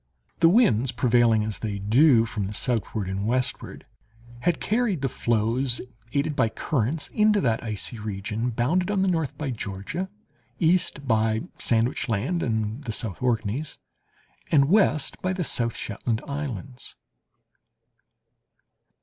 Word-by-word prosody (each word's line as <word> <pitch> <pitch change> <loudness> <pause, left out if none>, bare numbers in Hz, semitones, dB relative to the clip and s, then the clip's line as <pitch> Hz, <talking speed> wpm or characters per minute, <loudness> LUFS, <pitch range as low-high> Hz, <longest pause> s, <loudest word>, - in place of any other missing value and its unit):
The 165 - +6
winds, 135 - +4
prevailing, 120 -4 +3
as 110 -1 -4
they 105 -3 -3
do, 115 +4 +4
from 105 -3 -3
the 105 - -5
southward 110 -5 -1
and 95 +2 -2
westward, 125 +2 -2 0.5
had 170 +5 0
carried 215 - 0
the 135 - +1
floes, 120 +3 +1 0.3
aided 145 +2 0
by 115 - +2
currents, 140 +5 -2
into 210 -1 +3
that 115 -4 0
icy 110 +1 -4
region 105 +3 -3
bounded 150 - 0
on 200 -2 +1
the - - +2
north 160 -7 -1
by 145 -3 -3
Georgia, 105 - -4 0.5
east 165 -4 +1
by 110 -1 +2 0.2
Sandwich 120 +2 +1
Land 115 - 0
and 110 +2 -2
the 120 - -4
South 110 -3 -3
Orkneys, 120 +4 -1 0.7
and 140 -2 +4
west 175 -7 +2
by 185 0 0
the 185 -1 -2
South 115 -5 -1
Shetland 110 +2 -3
islands. 135 -3 -6
120 Hz, 135 wpm, -25 LUFS, 110-155 Hz, 0.7 s, The